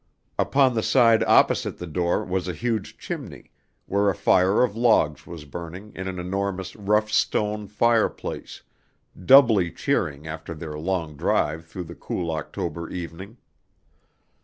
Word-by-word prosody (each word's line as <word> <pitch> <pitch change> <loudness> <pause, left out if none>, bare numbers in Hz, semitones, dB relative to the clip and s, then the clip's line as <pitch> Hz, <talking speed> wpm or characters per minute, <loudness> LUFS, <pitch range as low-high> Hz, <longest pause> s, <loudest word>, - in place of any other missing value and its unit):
Upon 135 -2 +3
the 115 - 0
side 115 -2 +4
opposite - - +3
the 90 - -6
door 85 +1 -1
was 95 0 -2
a 90 - -2
huge 115 0 -3
chimney, - - -7 0.3
where 100 +1 +1
a 95 - 0
fire 95 +7 +3
of 110 -5 0
logs 110 - +2
was 85 -3 -9
burning 85 +7 -8
in 95 0 -5
an 95 -1 -4
enormous 95 +1 -3
rough 105 +1 +1
stone 105 -1 0
fireplace, 115 +2 -1 0.6
doubly 115 -9 +6
cheering 75 0 -1
after 80 +1 -7
their 75 -1 -7
long 80 -2 -3
drive 80 +3 0
through 90 +2 -6
the 80 - -10
cool 85 -2 -4
October 80 +1 -4
evening. 90 +5 -7
95 Hz, 140 wpm, -24 LUFS, 85-105 Hz, 0.6 s, doubly